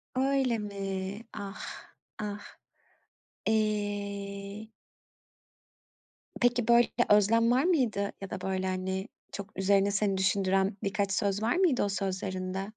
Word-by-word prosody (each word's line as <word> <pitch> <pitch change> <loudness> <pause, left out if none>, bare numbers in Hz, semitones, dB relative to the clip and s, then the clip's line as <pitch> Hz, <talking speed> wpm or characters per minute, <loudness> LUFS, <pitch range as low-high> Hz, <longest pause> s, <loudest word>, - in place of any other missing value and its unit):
Öyle 265 -2 +2
mi? 195 0 -4
Ah, 200 -1 -8 0.2
ah. 205 -1 -6 0.9
Eee 205 -1 -2 1.7
Peki, 245 -1 +3
böyle, 235 0 +6
bir - - +5
özlem 230 +3 +4
var 260 +3 +4
mıydı 240 - +1
ya 195 - -6
da, 190 -3 -5
böyle, 190 0 -1
hani, 190 +2 -2 0.2
çok 200 -1 -8
üzerine 200 +1 +3
seni 195 -1 +1
düşündüren 190 +1 +2
birkaç 200 0 0
söz 200 +1 0
var 230 +7 +2
mıydı 350 - +3
o 200 - 0
sözlerinde? 190 0 -2
200 Hz, 115 wpm, -30 LUFS, 195-220 Hz, 1.7 s, böyle